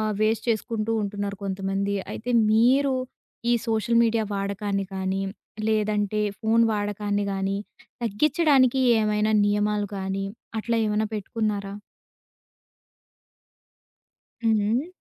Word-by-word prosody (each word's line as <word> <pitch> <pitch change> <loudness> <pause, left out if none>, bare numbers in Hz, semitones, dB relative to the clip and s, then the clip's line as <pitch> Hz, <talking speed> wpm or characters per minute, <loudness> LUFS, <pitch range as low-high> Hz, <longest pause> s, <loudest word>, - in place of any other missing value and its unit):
ఆహ్, 215 0 0
వేస్ట్ 220 0 +1
చేసుకుంటూ 225 0 -1
ఉంటున్నారు 200 0 -3
కొంతమంది. 195 +1 -1 0.2
అయితే 245 +2 -5 0.2
మీరు 260 +5 +4 0.6
ఈ - - +5
సోషల్ 225 +1 +2
మీడియా 225 -1 +1
వాడకాన్ని 200 0 -2
కాని, 190 0 -1 0.5
లేదంటే 210 -1 +1 0.2
ఫోను 230 +1 +3
వాడకాన్ని 205 0 -1
గాని, 195 0 -1 0.5
తగ్గించడానికి 265 - +3 0.2
ఏవైనా 210 0 +1
నియమాలు 205 0 +1
కాని, 195 0 -2 0.3
అట్లా 230 +1 0
ఏవన్నా 210 0 0
పెట్టుకున్నారా? 205 -1 -3 2.7
హ్మ్. 225 - +4
హ్మ్. 230 +8 0
210 Hz, 100 wpm, -25 LUFS, 200-225 Hz, 2.7 s, ఈ